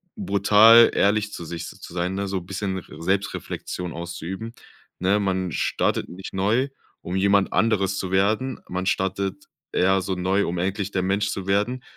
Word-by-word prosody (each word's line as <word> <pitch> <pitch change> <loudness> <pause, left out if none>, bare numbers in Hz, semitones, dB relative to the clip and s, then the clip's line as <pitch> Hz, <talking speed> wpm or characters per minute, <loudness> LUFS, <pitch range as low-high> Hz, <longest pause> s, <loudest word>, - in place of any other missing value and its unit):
brutal 115 - +6
ehrlich 105 +1 +1
zu - - -6
sich 85 +1 -6
z - - -12
zu - - -9
sein, 90 +1 -1
ne, 100 0 -2
so 95 -1 -1
bisschen 95 +2 -4
r 90 - -10
Selbstreflexion 95 -1 -3
auszuüben, 85 +6 -6 0.5
ne? 95 +3 +2
Man 95 -3 -1
startet - - 0
nicht 95 +2 -9
neu 110 +8 +1 0.3
um 90 - -5
jemand 100 0 +3
anderes 100 -3 +1
zu 95 -1 -4
werden. 110 +7 +1
Man 95 +1 -3
startet 95 +1 -1 0.3
eher 95 +1 +3
so 95 0 -2
neu, 95 +3 +1
um 85 - -3
endlich 95 +2 -2
der 95 - 0
Mensch 100 +2 0
zu 95 - -4
werden, 105 +6 0
95 Hz, 170 wpm, -24 LUFS, 95-105 Hz, 0.5 s, brutal